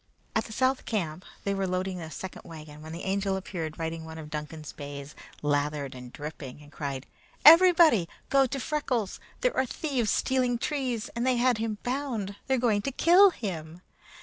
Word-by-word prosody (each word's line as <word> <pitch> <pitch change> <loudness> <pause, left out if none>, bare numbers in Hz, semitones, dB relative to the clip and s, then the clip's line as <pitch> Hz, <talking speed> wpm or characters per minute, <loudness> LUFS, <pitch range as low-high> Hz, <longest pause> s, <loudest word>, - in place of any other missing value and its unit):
At 220 - +1
the - - -10
South 260 +3 +1
camp 180 -5 -2 0.2
they 200 - 0
were 195 -1 -1
loading 185 0 -2
a 160 - -6
second 185 +4 -7
wagon, 155 -3 -10
when 160 +1 -9
the 170 +2 -6
Angel 195 0 0
appeared 165 -5 -5
riding 165 0 -3
one 160 0 -8
of 150 -2 -9
Duncan's 150 0 -6
bays, 140 0 -8 0.3
lathered 145 -1 0
and 125 -1 -10
dripping, 145 -2 -8
and 145 - -16
cried: 140 -4 -4 0.4
"Everybody 330 - +8 0.2
go 275 -1 +5
to 275 - -3
Freckles! 255 -8 -1 0.2
There - - +1
are 260 - +2
thieves 255 -6 -1
stealing 250 0 +1
trees, 250 -4 -2
and 235 - -1
they 255 0 +3
had 245 -2 +3
him 220 -1 -2
bound. 245 -7 -2
They're 265 0 +2
going 225 -4 +2
to 275 - -2
kill 355 +8 +7
him!" 175 - -6
195 Hz, 180 wpm, -28 LUFS, 155-255 Hz, 0.4 s, Everybody